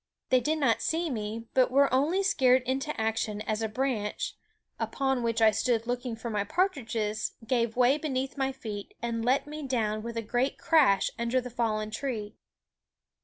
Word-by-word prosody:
They 255 - +5
did 310 +5 0
not 260 -7 +2
see 325 0 0
me, 220 0 -4
but 255 -1 +4
were 275 +1 +3
only 315 +9 +2
scared 260 -10 +4
into 265 +2 -2
action 220 -1 -1
as 215 0 -2
a 220 - -1
branch, 220 -3 -2 0.4
upon 265 -2 0
which 230 -1 +1
I 220 - +7
stood 230 +1 0
looking 245 0 -2
for 230 +1 -5
my 205 -2 0
partridges, 225 - -1
gave 230 -1 0
way 255 +4 +4
beneath 270 -2 -2
my 270 -1 0
feet 215 -6 -7
and 230 -1 -2
let 255 +4 +2
me 300 +1 -7
down 215 -4 0
with 235 +1 -6
a 230 - -1
great 245 +5 0
crash 270 - +4
under 235 +2 +1
the 250 -1 -7
fallen 215 -2 -1
tree. 220 -3 -4
245 Hz, 175 wpm, -29 LUFS, 220-270 Hz, 0.4 s, I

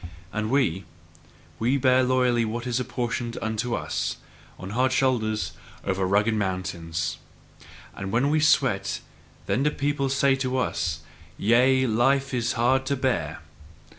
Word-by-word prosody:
And 110 0 -2
we 115 - +1 0.7
we 125 +5 +2
bear 130 -1 +4
loyally 125 -2 +2
what 115 +2 -3
is 125 0 0
apportioned 120 -1 -3
unto 110 +2 -2
us, - - -2 0.4
on 95 +1 -7
hard 130 +4 +2
shoulders, 115 -5 +1 0.3
over 95 -1 0
rugged 105 +4 +2
mountains! 85 -5 -2 0.8
And 95 0 -5
when 125 +5 +2
we 155 - +3
sweat, 150 -2 +2 0.4
then 130 - 0
do 150 - +3
people 145 -1 -1
say 140 0 +3
to 130 -1 -1
us: 85 -9 -1 0.4
"Yea, 130 +4 +4
life 135 +4 +2
is 120 -1 0
hard 130 +3 +2
to 140 - +1
bear!" 125 - -1
120 Hz, 135 wpm, -25 LUFS, 105-130 Hz, 0.8 s, bear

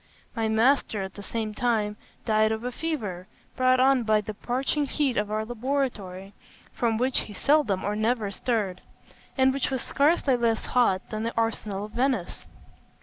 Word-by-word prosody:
My 225 -2 0
master, 220 -2 +2
at 190 0 -7
the 205 - -9
same 215 +1 -3
time, 215 -3 0 0.3
died 215 -1 +3
of 220 +1 -3
a 250 - -2
fever, 225 - -4 0.3
brought 255 0 +3
on 265 0 +5
by 215 -2 +3
the 215 +1 -6
parching 265 +6 -1
heat 275 -3 0
of 210 -1 0
our 215 +1 -1
laboratory, 225 -6 -3 0.4
from 230 -2 0
which 255 +3 +1
he 210 - -7
seldom 255 -8 +2
or 205 +1 -1
never 220 -1 0
stirred, 200 -4 -2 0.6
and 265 0 +4
which 275 - -1
was 260 -2 -2
scarcely 285 -2 +2
less 230 -2 0
hot 215 -7 +1
than 215 - -3
the 230 +1 -3
arsenal 215 -3 -1
of 210 - -11
Venice. 245 -6 -1
225 Hz, 170 wpm, -26 LUFS, 210-255 Hz, 0.6 s, on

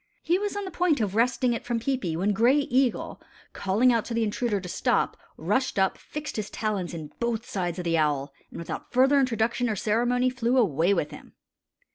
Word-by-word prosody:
He 345 +3 +2
was 410 0 -3
on 405 - -3
the 375 - -6
point 350 -5 +1
of 205 -4 -1
wresting 245 +2 +2
it 235 - -4
from 240 -1 -1
Peepi, 225 -9 -1
when 200 +4 +1
Gray 235 +7 +4
Eagle, 265 -3 0 0.3
calling 220 +6 +2
out 230 -2 +1
to 235 - -4
the 230 - +1
intruder 215 0 -1
to 185 - -8
stop, - - 0 0.2
rushed 260 -4 0
up, 190 -1 +2
fixed 300 -3 -7
his 210 -1 -3
talons 200 -6 -3
in 155 -2 -7
both 235 -1 -2
sides 175 -3 -3
of 180 - -5
the 165 -1 +2
owl, 145 -2 0 0.2
and - - -10
without 170 - -6
further 265 +3 +4
introduction 240 -1 +1
or 215 - 0
ceremony 245 +5 +1
flew 245 0 0
away 175 - +3
with 170 -6 0
him. - - -12
230 Hz, 205 wpm, -26 LUFS, 190-255 Hz, 0.3 s, Gray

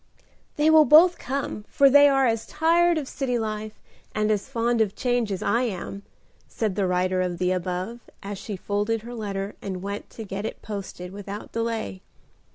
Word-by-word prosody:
"They 305 +2 +4
will 315 -1 +7
both 330 +6 +7
come, 265 -5 -3
for 280 - +4
they 285 +1 +7
are 270 -1 +3
as 225 -2 0
tired 335 +2 +3
of 290 -4 -3
city 255 -3 -2
life 215 -1 -4 0.4
and 215 0 +1
as 210 +4 -1
fond 235 -2 +1
of 210 -2 0
change 245 -4 0
as 195 +1 -3
I 235 - +2
am," 200 -4 -4 0.5
said 215 -4 -2
the 195 -1 +1
writer 185 0 +1
of 180 -1 -2
the 180 +1 +1
above, 185 +5 -3 0.2
as 200 0 -5
she 210 - -5
folded 210 +3 -1
her 240 +1 -8
letter 200 -3 -4
and 190 -2 -5
went 200 +1 -5
to 225 - -8
get 200 -1 -5
it - - -6
posted 195 -3 -6
without 200 +1 -7
delay. 225 - -3
215 Hz, 185 wpm, -25 LUFS, 195-245 Hz, 0.5 s, will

